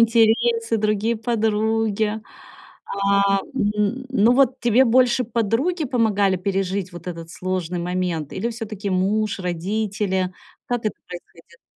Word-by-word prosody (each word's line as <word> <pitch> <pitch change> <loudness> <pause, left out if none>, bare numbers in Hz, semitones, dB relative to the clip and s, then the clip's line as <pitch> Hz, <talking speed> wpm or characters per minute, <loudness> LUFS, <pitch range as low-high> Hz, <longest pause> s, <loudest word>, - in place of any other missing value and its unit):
интересы, 230 0 +3
другие 215 +2 +1
подруги. 220 -1 0 0.7
А, 200 0 +2 0.2
м, 210 +1 0
ну, 230 -1 +4
вот 265 0 +3
тебе 240 +2 +4
больше 250 +1 +3
подруги 240 - 0
помогали 210 -6 +2
пережить 190 0 -2
вот 175 0 -10
этот 165 -2 -6
сложный 180 -1 -3
момент 175 -3 -2
или 230 +5 -2
всё-таки 215 -3 -5
муж, 205 +3 0
родители? 190 +1 -1 0.3
Как 245 -1 -1
это 215 - -1
происходило? 170 -1 -14
210 Hz, 115 wpm, -22 LUFS, 185-230 Hz, 0.7 s, ну